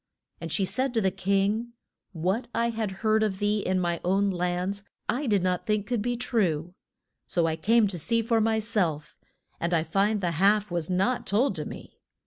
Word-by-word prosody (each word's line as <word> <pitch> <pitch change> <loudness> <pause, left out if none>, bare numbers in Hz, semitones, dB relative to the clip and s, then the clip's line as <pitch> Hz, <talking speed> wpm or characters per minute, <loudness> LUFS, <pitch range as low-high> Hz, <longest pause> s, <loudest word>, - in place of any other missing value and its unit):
And 165 -1 -6
she 190 +5 +1
said 260 +5 -1
to - - +4
the 190 -2 +2
king, 200 +5 0 0.4
What 190 +7 -1
I 235 0 +1
had 220 -2 -2 0.2
heard 220 0 +4
of 210 -3 0
thee 205 +1 +1
in 185 -2 0
my 170 -2 -1
own 195 +2 +2
lands 180 +2 -2 0.2
I 260 +4 -1
did 205 -5 +2
not 180 -1 -1
think 210 -1 +1
could 240 -1 -1
be 240 +2 -1
true. 180 -9 0 0.5
So 170 -2 +1
I 160 -1 0
came 220 +7 +3
to 180 -3 -4
see 230 +7 +1
for 225 0 +2
my 220 0 +2
self, 175 -9 -1 0.4
and 170 +1 0
I 160 - +2
find 200 +6 +1
the 175 -3 -1
half 200 +4 +2
was 170 -1 -2
not 195 +7 0
told 230 +8 +2
to - - -4
me. - - -10
200 Hz, 200 wpm, -27 LUFS, 180-220 Hz, 0.5 s, to